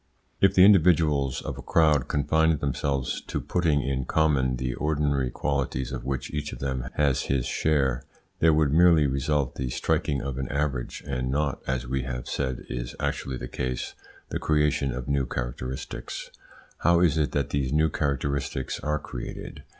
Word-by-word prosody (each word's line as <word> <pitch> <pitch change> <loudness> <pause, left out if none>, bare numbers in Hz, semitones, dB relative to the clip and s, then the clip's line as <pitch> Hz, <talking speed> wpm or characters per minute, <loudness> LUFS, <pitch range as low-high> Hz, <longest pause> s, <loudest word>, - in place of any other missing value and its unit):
If 95 - +4
the 95 - +8
individuals 80 -8 +4
of - - -5
a - - -5
crowd 75 -5 +3
confined 80 +2 +2
themselves 70 -1 -1
to - - -2
putting 80 -5 +1
in 65 0 -1
common 70 -5 +2
the 65 0 -2
ordinary 70 -3 0
qualities 65 -1 -2
of 65 -2 -5
which 65 -1 -3
each 75 0 -3
of - - -7
them 65 -2 -3
has 70 -3 +2
his 65 -3 0
share, 70 -4 +1 0.4
there 80 - +5
would 75 -2 +2
merely 85 -2 +6
result 70 0 0
the 65 -1 -3
striking 75 +2 0
of 65 -1 -4
an 65 - -2
average, 70 -3 -2
and 65 -2 -2
not, 70 +1 -1
as 65 -1 -1
we 65 +2 -1
have 60 -1 -5
said 65 -3 -3
is - - -5
actually 65 -2 -2
the 60 - -6
case, 65 0 -3 0.4
the - - -2
creation 75 -3 +1
of 60 0 -5
new 70 -2 +1
characteristics. 65 +1 -5 0.5
How 85 0 +4
is 80 -3 +3
it 75 -5 +1
that - - -1
these 70 -2 0
new 75 +1 +3
characteristics 70 -2 -2
are 75 0 -1
created? - - -7
70 Hz, 170 wpm, -26 LUFS, 65-75 Hz, 0.5 s, the